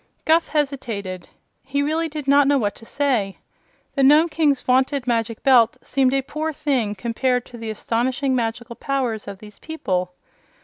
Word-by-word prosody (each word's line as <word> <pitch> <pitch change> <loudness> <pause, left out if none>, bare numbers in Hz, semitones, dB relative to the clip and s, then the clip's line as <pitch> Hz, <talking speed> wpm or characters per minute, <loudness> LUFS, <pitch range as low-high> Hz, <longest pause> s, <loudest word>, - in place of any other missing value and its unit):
Guph 325 +1 +3
hesitated. 230 - -3 0.4
He 280 +1 -1
really 320 +2 -1
did 300 -2 -6
not 280 0 +5
know 285 0 +4
what 205 -5 0
to 225 - -14
say. 245 -9 0 0.6
The 275 - 0
Nome 300 +5 +6
King's 295 -4 +2
vaunted 260 +1 +1
Magic 230 -2 -1
Belt 245 -4 +5
seemed 265 -1 +1
a 270 - 0
poor 305 +3 -3
thing 270 -9 -1
compared 245 +4 -1
to 240 - -12
the 225 -1 -5
astonishing 255 +5 -1
magical 235 0 -3
powers 250 -7 -2
of 200 -1 -7
these 210 +1 -14
people. 185 - -3
260 Hz, 165 wpm, -22 LUFS, 225-285 Hz, 0.6 s, Nome